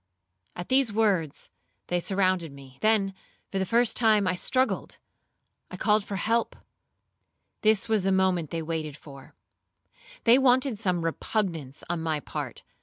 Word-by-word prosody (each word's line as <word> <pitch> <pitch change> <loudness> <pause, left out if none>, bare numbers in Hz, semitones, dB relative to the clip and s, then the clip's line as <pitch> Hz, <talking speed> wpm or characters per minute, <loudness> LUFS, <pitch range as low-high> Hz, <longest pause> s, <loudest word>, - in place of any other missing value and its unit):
At 175 - -7
these 260 -3 +3
words, 200 -9 0 0.3
they 175 - 0
surrounded 185 -3 0
me; 135 -1 -14
then, 215 -3 +2 0.4
for 195 - -1
the 190 - -1
first 235 +2 +3
time, 215 -3 +4
I 185 - +1
struggled,—I 255 +8 -4
called 210 -1 +2
for 200 - -5
help;—this 220 -1 -3
was 220 -2 +2
the 195 +1 +1
moment 185 -4 +1
they 165 -1 -3
waited 155 -2 -4
for; 140 -3 -14 0.9
they 240 +2 +6
wanted 255 -3 +3
some 180 -5 0
repugnance 165 - -3
on 175 -1 -2
my 160 -2 -1
part. - - -6
190 Hz, 135 wpm, -27 LUFS, 165-220 Hz, 0.9 s, they